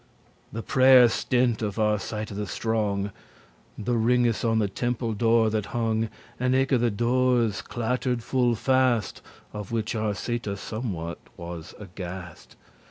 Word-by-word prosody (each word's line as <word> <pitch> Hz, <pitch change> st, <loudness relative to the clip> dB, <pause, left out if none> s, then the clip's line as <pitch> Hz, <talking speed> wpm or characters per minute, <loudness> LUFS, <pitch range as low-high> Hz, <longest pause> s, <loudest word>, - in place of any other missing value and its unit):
The 115 Hz, +1 st, -5 dB
prayer 130 Hz, -1 st, +7 dB
stint* 120 Hz, 0 st, +1 dB
of 105 Hz, -2 st, -2 dB
Arcita 105 Hz, 0 st, -1 dB
the 105 Hz, +1 st, -4 dB
strong, 105 Hz, -1 st, -1 dB, 0.7 s
*ended 105 Hz, -, -7 dB
The 120 Hz, -1 st, +1 dB
ringes 120 Hz, 0 st, +2 dB
on 115 Hz, -1 st, +2 dB
the 105 Hz, -2 st, +2 dB
temple 120 Hz, +2 st, -2 dB
door 115 Hz, 0 st, +3 dB
that 105 Hz, -2 st, -1 dB
hong, 115 Hz, -1 st, 0 dB, 0.3 s
And 125 Hz, +1 st, +2 dB
eke 135 Hz, 0 st, +2 dB
the 120 Hz, -3 st, +3 dB
doores, 120 Hz, -1 st, +1 dB
clattered 125 Hz, 0 st, -2 dB
full 125 Hz, -2 st, +1 dB
fast, 130 Hz, -3 st, +1 dB, 0.3 s
Of 105 Hz, -1 st, -6 dB
which 115 Hz, 0 st, -1 dB
Arcita 110 Hz, 0 st, -2 dB
somewhat 95 Hz, -7 st, -5 dB, 0.2 s
was 85 Hz, -1 st, -8 dB
aghast. 90 Hz, -3 st, -9 dB
115 Hz, 135 wpm, -26 LUFS, 105-120 Hz, 0.7 s, prayer